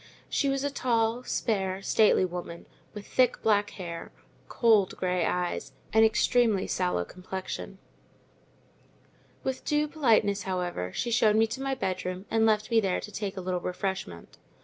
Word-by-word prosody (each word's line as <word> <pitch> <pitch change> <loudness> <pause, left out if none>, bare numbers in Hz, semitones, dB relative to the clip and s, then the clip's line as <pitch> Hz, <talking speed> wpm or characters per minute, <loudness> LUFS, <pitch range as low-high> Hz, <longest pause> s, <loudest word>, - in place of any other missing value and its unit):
She 280 - +1
was 275 0 -1
a 285 - -1
tall, 235 -2 0
spare, 195 -4 -1
stately 215 -3 +4
woman, 175 -1 -6 0.3
with 205 -1 -7
thick 255 -1 +1
black 210 -1 +3
hair, 170 -4 -7 0.4
cold 220 -5 +3
grey 180 -2 0
eyes, 180 -1 -2 0.2
and 220 0 +6
extremely 220 -2 +3
sallow 180 - -1
complexion. 190 - -7 1.7
With 265 -1 -3
due 300 0 +1
politeness, 225 -9 +2
however, 180 - -3
she 240 - -2
showed 220 -2 +4
me 225 +1 +4
my 270 0 -1
bedroom, 185 -4 -3
and 225 0 +3
left 215 +1 +1
me 230 - +5
there 190 -3 0
to 210 - -8
take 200 -2 -4
a - - -3
little 180 -1 -2
refreshment. 180 - -5
205 Hz, 150 wpm, -28 LUFS, 185-230 Hz, 1.7 s, and